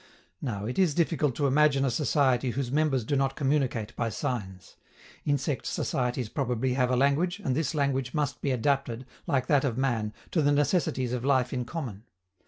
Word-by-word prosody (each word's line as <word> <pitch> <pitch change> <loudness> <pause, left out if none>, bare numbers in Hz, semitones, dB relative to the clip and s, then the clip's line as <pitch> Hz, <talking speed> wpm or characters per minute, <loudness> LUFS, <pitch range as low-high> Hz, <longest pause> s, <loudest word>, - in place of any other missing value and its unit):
Now, 105 -7 -3
it 125 - -3
is 175 -7 +3
difficult 155 -6 +1
to 145 - 0
imagine 140 0 +4
a 130 - +1
society 130 -2 +2
whose 125 0 -2
members 140 -5 +1
do 140 - 0
not 135 -1 +1
communicate 135 -6 0
by 115 -1 -1
signs. 95 -5 -4 0.5
Insect 145 -1 -1
societies 125 -2 -1
probably 125 0 -1
have 125 -1 +2
a 125 - +2
language, 145 +8 +2
and 130 -11 -1
this 160 +1 -1
language 135 -3 0
must 150 -2 -1
be 140 - -1
adapted, 130 -1 0 0.2
like 135 -6 +1
that 145 -1 +3
of 125 -4 -1
man, 120 -5 0 0.2
to 165 - +2
the 145 0 +3
necessities 145 -4 +1
of 125 -1 -2
life 130 -2 +2
in 125 -2 -2
common. 115 - -6
135 Hz, 185 wpm, -28 LUFS, 125-145 Hz, 0.5 s, imagine